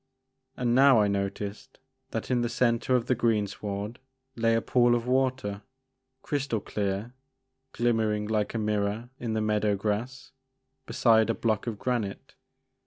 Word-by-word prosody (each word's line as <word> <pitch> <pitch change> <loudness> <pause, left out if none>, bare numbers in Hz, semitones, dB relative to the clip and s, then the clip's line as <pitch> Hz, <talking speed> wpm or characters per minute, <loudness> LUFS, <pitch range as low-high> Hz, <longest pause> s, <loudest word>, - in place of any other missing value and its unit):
And 120 -1 +1
now 135 -1 +6
I 105 - +3
noticed 100 +4 -4 0.3
that 115 +1 -4
in 125 -1 +2
the 120 - 0
centre 120 +1 +1
of 120 -2 +1
the - - +2
greensward 105 -1 -2 0.4
lay 115 0 +2
a 115 - +1
pool 120 -1 +3
of 120 -1 -2
water, 130 -5 0 0.6
crystal 140 -6 -1
clear, 100 +3 -3 0.6
glimmering 110 -3 +1
like 105 0 -1
a - - +1
mirror 105 +2 -1
in 115 -2 -3
the 110 - 0
meadow 105 -1 +1
grass, 110 +6 -3 0.6
beside 110 -2 +3
a 115 - +1
block 110 -1 -1
of 110 -3 -3
granite. 110 -4 -3
115 Hz, 145 wpm, -28 LUFS, 105-120 Hz, 0.6 s, now